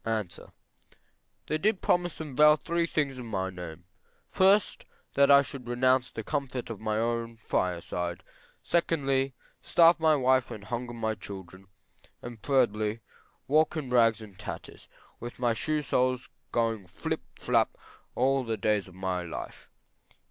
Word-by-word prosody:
A. 110 -2 0 1.2
They 155 - -1
did 205 +2 +1
promise 175 -2 +1
and 150 -5 -6
vow 150 +2 +7
three 170 +2 -1
things 140 -6 -1
in 120 - -7
my 95 -3 -2
name, 90 -2 -9 0.5
first, 195 +2 +3 0.3
that 140 0 +4
I 140 0 +8
should 135 -3 -8
renounce 130 +1 +2
the 110 - -6
comfort 130 -3 -3
of 110 - -6
my 110 0 -1
own 115 0 -1
fire 90 -5 -1
side; 90 +1 -4 0.4
secondly, 135 -6 +1 0.3
starve 170 0 +5
my 160 -1 +4
wife 130 -2 +3
and 105 - -8
hunger 120 +2 -4
my 110 -1 -1
children; 95 -2 -10 0.7
thirdly, 110 -3 +1 0.5
walk 155 +3 +3
in 135 -5 -4
rags 115 -2 +4
and 100 -3 -14
tatters, - - -7 0.3
with 120 +1 -7
my 120 -2 +1
shoe 150 +6 -1
soles 130 0 0 0.2
going 115 -5 0
flip - - -4
flap - - +1 0.4
all 135 0 +2
the 115 -2 -2
days 105 -1 +1
of 90 - -15
my 95 -1 -2
life. 85 -2 -8
120 Hz, 150 wpm, -29 LUFS, 105-140 Hz, 1.2 s, I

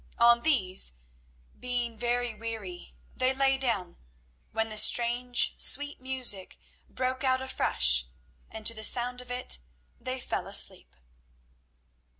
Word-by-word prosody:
On 235 0 +4
these, 190 - 0 0.7
being 245 -2 -4
very 240 +1 -3
weary, 210 - -8 0.2
they 255 +1 0
lay 270 0 +1
down, 210 -9 -3 0.5
when 225 0 -3
the 215 - -5
strange, 240 +2 +4
sweet 290 0 +1
music 255 -7 +1 0.3
broke 255 +1 -4
out 260 -1 +1
afresh, 65 - +2 0.4
and 220 -1 -10
to 230 - +5
the 220 -1 -7
sound 245 +2 +2
of 250 - -15
it 250 - +1 0.4
they 260 0 -6
fell - - -5
asleep. - - +1
240 Hz, 125 wpm, -27 LUFS, 220-255 Hz, 0.7 s, to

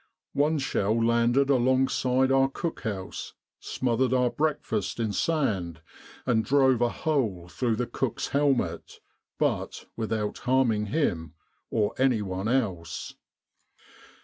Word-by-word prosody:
One 150 +2 +2
shell 115 -5 0
landed 120 +4 +3
alongside 130 0 +2
our 135 0 +4
cook 165 +4 -4
house, 100 -6 -5 0.3
smothered 130 +1 0
our 125 -1 +2
breakfast 145 -10 -1
in 110 -3 -1
sand, 100 - 0 0.5
and 110 -3 +2
drove 130 0 +3
a 120 - +3
hole 115 - -1
through 115 +5 -1
the 125 +2 -1
cook's 130 +1 -3
helmet, 140 -2 0 0.4
but - - -1
without 110 -2 -2
harming 120 -5 +2
him 85 - -1 0.3
or 105 -2 0
anyone 105 -7 +1
else. 105 -10 -2
120 Hz, 115 wpm, -27 LUFS, 105-135 Hz, 0.5 s, our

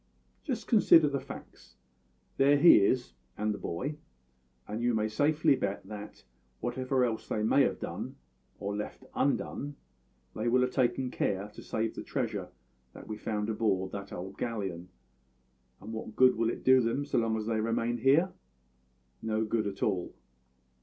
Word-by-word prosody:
Just 265 -7 -3
consider 165 -8 +6
the 140 -1 -1
facts. 135 - -11 0.6
There 140 +1 +5
is 145 - +3 0.5
he - - -30 0.2
and 105 +1 0
the - - -7
boy; 140 - -4 0.7
and 110 +2 -4
you 120 -1 +2
may 110 0 +1
safely 145 +6 +3
bet 100 -6 -3
that, 105 +1 -9 0.4
whatever 130 - 0
else 115 -2 -3
they 105 - -1
may 115 +6 +4
have - - +1
done, - - -5 0.4
or 100 +1 -3
left 105 +5 -5
undone, 145 +1 -1 0.6
they 110 +2 -2
will 125 +2 +4
have 125 0 +1
taken 130 0 +1
care 100 +1 -1
to 105 - -12
save 110 0 -2
the - - -6
treasure - - -3 0.4
that - - -12
we 110 - -4
found 105 0 -3
aboard 95 -4 0
that 100 0 -7
old 95 +2 -7
galleon; 95 -7 -3 0.9
and 110 - -8
what 110 -1 -6
good 130 -1 +6
will 115 0 +1
it - - -5
do 130 0 +6
them 120 +5 0
so 140 - +1
long 115 -1 0
as 110 - -3
they 110 0 0
remain 115 +2 0
here? 145 +9 +4 0.9
No 110 0 0
good 110 -1 0
at 100 -1 -4
all. 95 -4 -1
115 Hz, 165 wpm, -30 LUFS, 105-130 Hz, 0.9 s, consider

